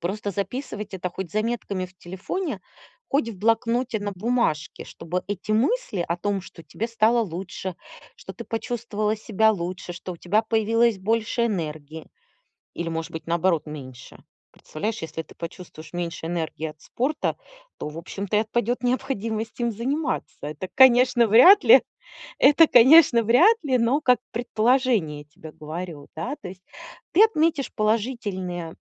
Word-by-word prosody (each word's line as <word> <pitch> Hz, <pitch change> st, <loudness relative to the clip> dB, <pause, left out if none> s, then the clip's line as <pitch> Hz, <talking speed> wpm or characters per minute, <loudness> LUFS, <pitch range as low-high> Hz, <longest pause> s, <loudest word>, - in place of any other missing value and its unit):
Просто 200 Hz, +3 st, -3 dB
записывать 210 Hz, 0 st, -5 dB
это 185 Hz, -1 st, -3 dB
хоть 180 Hz, 0 st, -7 dB
заметками 215 Hz, -4 st, -2 dB
в 185 Hz, 0 st, -23 dB
телефоне, 190 Hz, -, -5 dB, 0.5 s
хоть 275 Hz, -4 st, +1 dB
в 205 Hz, -5 st, -8 dB
блокноте 230 Hz, +2 st, 0 dB
на 205 Hz, 0 st, -3 dB
бумажке, 185 Hz, -8 st, -1 dB
чтобы 175 Hz, +2 st, -5 dB
эти 205 Hz, +1 st, -3 dB
мысли 230 Hz, -, 0 dB
о 170 Hz, -, -1 dB
том, 200 Hz, +1 st, -2 dB
что 165 Hz, -, -13 dB
тебе 230 Hz, +2 st, -4 dB
стало 230 Hz, +1 st, +3 dB
лучше, 185 Hz, -1 st, -6 dB, 0.4 s
что -, -, -10 dB
ты -, -, -8 dB
почувствовала 225 Hz, -2 st, -2 dB
себя 220 Hz, +1 st, +2 dB
лучше. 180 Hz, -1 st, -5 dB
Что 180 Hz, +1 st, -7 dB
у -, -, -10 dB
тебя 210 Hz, +5 st, +1 dB
появилось 225 Hz, -1 st, +2 dB
больше 225 Hz, +3 st, 0 dB
энергии 155 Hz, -5 st, -5 dB, 0.7 s
или, 170 Hz, -1 st, -4 dB
может 165 Hz, +1 st, -4 dB
быть, 160 Hz, -, -7 dB
наоборот, 170 Hz, -1 st, +1 dB
меньше. 130 Hz, -5 st, -10 dB, 0.3 s
Представляешь, 215 Hz, +8 st, -5 dB
если 160 Hz, 0 st, -5 dB
ты 155 Hz, -, -18 dB
почувствуешь 165 Hz, -2 st, -9 dB
меньше 170 Hz, -2 st, -4 dB
энергии 160 Hz, -2 st, -3 dB
от 155 Hz, 0 st, -10 dB
спорта, 275 Hz, -, -2 dB, 0.4 s
то, -, -, -5 dB
в 150 Hz, -, -10 dB
общем-то, 195 Hz, +4 st, -4 dB
и 210 Hz, -, +4 dB
отпадет 240 Hz, +2 st, -1 dB
необходимость 230 Hz, -3 st, -2 dB
им 235 Hz, -1 st, +1 dB
заниматься. 270 Hz, +8 st, -3 dB
Это, 150 Hz, +5 st, -6 dB
конечно, 245 Hz, -2 st, +6 dB
вряд 350 Hz, -, +8 dB
ли, 465 Hz, -, +8 dB, 0.6 s
это, 295 Hz, +4 st, +6 dB
конечно, 255 Hz, -2 st, +7 dB
вряд 340 Hz, -, +5 dB
ли, 260 Hz, -3 st, +1 dB
но 245 Hz, +6 st, +2 dB
как 250 Hz, -5 st, +3 dB
предположение 230 Hz, -, +1 dB
тебе 155 Hz, +1 st, -13 dB
говорю, 155 Hz, -1 st, -7 dB
да. 250 Hz, -, -4 dB
То 180 Hz, -, -7 dB
есть 185 Hz, 0 st, -13 dB, 0.5 s
ты 405 Hz, +6 st, +7 dB
отметишь 320 Hz, -9 st, +1 dB
положительные 205 Hz, -7 st, -2 dB
210 Hz, 150 wpm, -24 LUFS, 175-240 Hz, 0.7 s, вряд